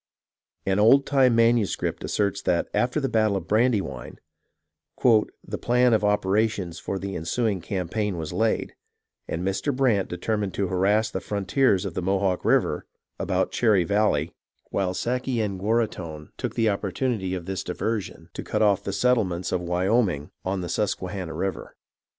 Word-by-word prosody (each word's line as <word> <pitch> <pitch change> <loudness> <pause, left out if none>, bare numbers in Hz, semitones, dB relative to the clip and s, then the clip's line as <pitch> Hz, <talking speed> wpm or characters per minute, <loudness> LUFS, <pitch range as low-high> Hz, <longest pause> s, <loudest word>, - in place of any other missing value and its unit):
An 95 +1 +1
old 135 +6 +6
time 130 -4 +4
manuscript 115 -2 +2
asserts 100 -1 0
that 85 -2 0
after 125 +5 +1
the 135 - 0
battle 110 -4 +2
of - - -7
Brandywine, 110 -1 0 0.7
" - - -57 0.5
The - - -4
plan 125 0 +3
of 110 - +2
opera 105 +1 +3
tions 90 -6 -6
for 100 - -3
the 95 0 -5
ensuing 100 +4 -1
campaign 95 +2 -2
was 80 -2 -5
laid, 110 0 0 0.5
and 85 +3 -3
Mr. 95 +9 0
Brant 120 -8 +2
determined 100 +2 -2
to 100 -2 -1
harass 100 +4 +2
the - - -3
Frontiers 100 0 +1
of 95 - -4
the 90 - -2
Mohawk 95 0 0
River - - +1 0.3
abt - - 0
Cherry 105 -6 +3
Valley 85 -5 +1
[illegible], - - -52 0.4
while 95 -2 0
Sakayenguaraghton 110 - -1
took - - -4
the 115 -1 +2
Opportunity 100 -1 -1
of 90 -2 -6
this 95 0 -3
diversion 90 -3 -4
to - - -5
cut - - 0
off 100 -3 +3
the 100 - -3
settle 125 +1 +3
ments 90 0 -4
of 90 - 0
Wayoming 90 -2 0
on 95 0 -2
the 90 - -5
Susquehanna 95 -4 -2
River." 95 +3 -4
100 Hz, 160 wpm, -25 LUFS, 90-115 Hz, 0.7 s, old